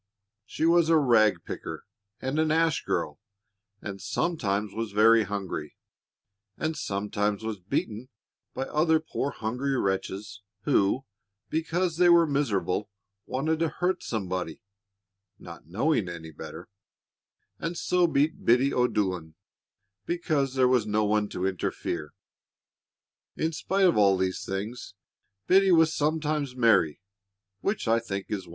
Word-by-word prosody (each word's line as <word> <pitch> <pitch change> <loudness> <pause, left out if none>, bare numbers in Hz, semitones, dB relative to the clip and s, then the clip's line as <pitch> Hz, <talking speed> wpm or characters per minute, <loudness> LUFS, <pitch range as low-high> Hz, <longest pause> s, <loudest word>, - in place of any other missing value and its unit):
She 160 - -2
was 170 -1 +4
a 165 - +6
rag 110 - +4
picker - - -6 0.3
and 135 +4 -2
an 160 0 +2
ash 160 0 +2
girl, - - -2 0.6
and 100 -2 -6
sometimes 105 - -1
was 110 -2 -4
very 110 +1 +5
hungry, 95 -7 -5 0.8
and 160 0 -2
sometimes 105 -2 -2
was 110 -2 -4
beaten 110 +6 -3 0.5
by 130 - -1
other 160 +3 +2
poor 155 -3 -3
hungry 130 +4 -2
wretches, 100 +1 -3 0.2
who, 110 +7 +2 0.5
because 165 +1 -1
they 175 0 +5
were 170 -1 +7
miserable, 110 - -1 0.4
wanted 155 +5 -1
to 165 -1 +1
hurt 180 +4 -1
somebody 95 -6 -4 0.7
not - - -12
knowing 105 - 0
any 80 -2 -8
better 75 - -9 0.9
and 165 +1 -3
so 180 +1 +2
beat 155 +1 0
Biddy 125 +4 +4
O'Dolan 95 -10 0 0.7
because 155 -6 0
there 130 -1 +4
was 125 -4 +2
no 105 0 +1
one 105 0 +1
to 90 - -3
interfere. 90 -5 -3 1.3
In 160 - 0
spite 195 +5 +1
of 175 - +4
all 100 -2 +5
these 95 0 -1
things, 100 +3 -5 0.5
Biddy 190 0 +5
was 160 -2 +5
sometimes 150 -3 -1
merry, 110 - +3 0.6
which 200 - -2
I 115 +1 +4
think 100 -4 -5
is 95 -4 -3
wonderful. - - -14
120 Hz, 130 wpm, -27 LUFS, 100-155 Hz, 1.3 s, were